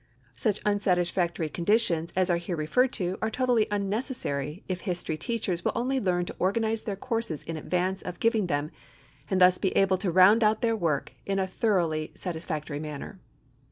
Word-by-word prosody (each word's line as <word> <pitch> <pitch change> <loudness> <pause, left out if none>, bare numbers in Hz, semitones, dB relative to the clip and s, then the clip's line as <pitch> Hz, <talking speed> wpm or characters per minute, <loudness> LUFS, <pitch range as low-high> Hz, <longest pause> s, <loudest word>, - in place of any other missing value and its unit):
Such 190 - 0
unsatisfactory 180 -4 +1
conditions 170 -1 +1
as 185 0 +2
are 170 - +3
here 170 +1 -4
referred 245 +12 +2
to 180 0 -2
are 220 - +1
totally 245 -2 +2
unnecessary 200 - -2
if 185 -1 -3
history 175 -3 -2
teachers 185 -3 -2
will - - 0
only 260 +3 0
learn 180 -5 0
to - - -7
organize 220 +3 +1
their 205 - -3
courses 230 - -3
in 165 - -5
advance 180 +4 -1
of 180 -1 -7
giving 225 -4 +2
them 145 -1 -1 0.6
and 190 - +1
thus 180 0 +6
be 190 - +1
able 190 -1 +3
to 195 -1 -1
round 190 +6 +6
out 215 0 +3
their 230 -1 +3
work 160 -9 -1
in 195 0 0
a 190 - +1
thoroughly 175 -6 0
satisfactory 160 -4 -4
manner. 150 -2 -7
185 Hz, 175 wpm, -27 LUFS, 170-215 Hz, 0.6 s, thus